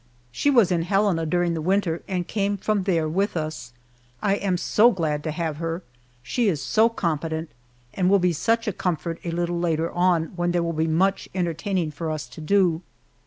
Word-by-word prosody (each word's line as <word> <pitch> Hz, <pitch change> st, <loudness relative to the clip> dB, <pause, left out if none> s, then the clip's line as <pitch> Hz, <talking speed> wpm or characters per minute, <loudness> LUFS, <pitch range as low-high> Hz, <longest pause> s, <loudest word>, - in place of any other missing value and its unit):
She 285 Hz, -, +1 dB
was 235 Hz, -9 st, +4 dB
in 170 Hz, -2 st, +2 dB
Helena 180 Hz, -2 st, +1 dB
during 175 Hz, +1 st, +1 dB
the 160 Hz, -, -3 dB
winter 180 Hz, -1 st, 0 dB
and 180 Hz, -3 st, -2 dB
came 200 Hz, -1 st, -1 dB
from 200 Hz, -1 st, -1 dB
there 165 Hz, -5 st, +1 dB
with 190 Hz, +4 st, 0 dB
us. 155 Hz, -6 st, -4 dB, 0.5 s
I 200 Hz, -2 st, +1 dB
am 190 Hz, -3 st, 0 dB
so 215 Hz, +6 st, +4 dB
glad 155 Hz, -8 st, -1 dB
to 160 Hz, -, -2 dB
have 155 Hz, -1 st, -3 dB
her. 165 Hz, +2 st, -3 dB, 0.4 s
She 240 Hz, -, 0 dB
is 165 Hz, -7 st, +1 dB
so 220 Hz, -, +3 dB
competent, 160 Hz, -5 st, -2 dB, 0.4 s
and 185 Hz, -1 st, +1 dB
will 200 Hz, -, +6 dB
be 180 Hz, -2 st, +2 dB
such 230 Hz, +8 st, 0 dB
a 210 Hz, -, 0 dB
comfort 170 Hz, -2 st, -2 dB
a 170 Hz, -, -3 dB
little 175 Hz, +1 st, -1 dB
later 165 Hz, -1 st, 0 dB
on, 175 Hz, -2 st, +1 dB
when 175 Hz, 0 st, 0 dB
there 175 Hz, -1 st, +1 dB
will 170 Hz, 0 st, -2 dB
be 160 Hz, +1 st, 0 dB
much 190 Hz, +5 st, +1 dB
entertaining 175 Hz, -1 st, -1 dB
for 160 Hz, +2 st, -4 dB
us 155 Hz, -1 st, -3 dB
to -, -, -10 dB
do. 175 Hz, -1 st, +2 dB
175 Hz, 200 wpm, -24 LUFS, 160-195 Hz, 0.5 s, will